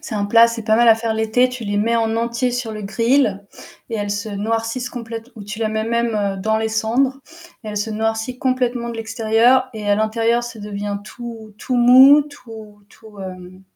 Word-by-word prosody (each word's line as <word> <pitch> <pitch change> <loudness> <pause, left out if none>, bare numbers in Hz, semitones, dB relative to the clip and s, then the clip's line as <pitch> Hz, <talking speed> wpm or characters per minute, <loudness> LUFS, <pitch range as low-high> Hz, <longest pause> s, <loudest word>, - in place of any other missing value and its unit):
c'est 220 - -7
un 205 -1 -1
plat, 230 +3 +6
c'est 230 -1 -5
pas 220 0 +2
mal 235 0 +4
à 225 - +8
faire 225 0 -2
l'été. 220 +3 +2
Tu 250 -2 -7
les 205 0 -2
mets 230 +3 +1
en 225 -1 0
entier 235 +2 -1
sur 245 -2 -3
le 215 -1 -7
grill 230 -1 +1 0.5
et 225 - -2
elles 205 -1 -3
se 205 +1 -3
noircissent 225 +4 -3
complète 230 -1 -7
ou 215 - -10
tu 210 +2 -7
la 225 -1 0
mets 220 0 -2
même, 235 0 0
heu, 200 -2 -1
dans 220 +3 0
les 220 0 -1
cendres, 235 +5 0 0.5
elle 210 -1 -6
se 210 +2 -2
noircit 225 +3 -2
complètement 250 -2 -1
de 230 - -7
l'extérieur 225 +3 +2
et 210 -1 -5
à - - +5
l'intérieur 225 +2 +1
ça 240 -2 -8
devient 205 0 -4
tout 225 -1 -9
tout 255 - -2
mou, 260 +4 +7
tout 220 -8 -13
tout, 220 -2 -17
hem, 185 -1 -9
225 Hz, 210 wpm, -19 LUFS, 215-240 Hz, 0.5 s, à